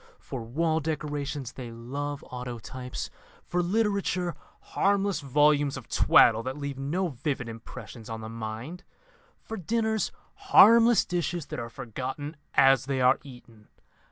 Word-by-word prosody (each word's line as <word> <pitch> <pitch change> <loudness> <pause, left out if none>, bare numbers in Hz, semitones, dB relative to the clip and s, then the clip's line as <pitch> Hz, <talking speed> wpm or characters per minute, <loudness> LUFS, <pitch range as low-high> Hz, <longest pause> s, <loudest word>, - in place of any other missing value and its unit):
For 130 - -7
wall 160 +8 0
decorations 145 -4 -3
they 125 -3 -8
love 140 +5 -5
autotypes; 125 0 -6 0.3
for 180 - 0
literature, 195 -2 0 0.4
harmless 200 -1 +2
volumes 145 0 +3
of - - -10
twaddle 115 -1 +5
that 130 +4 -5
leave 140 -2 -5
no 170 +7 -1
vivid 135 -2 -3
impressions 115 0 -9
on 115 0 -5
the 110 - -6
mind; 115 - -6 0.6
for 225 - -6
dinners, 220 +3 0 0.2
harmless 235 - +6
dishes 175 -2 -2
that - - -4
are 115 0 -5
forgotten 135 +5 -6 0.2
as 135 -2 +5
they 135 -1 -1
are 130 +1 +4
eaten. 120 -5 -15
140 Hz, 130 wpm, -28 LUFS, 125-175 Hz, 0.6 s, harmless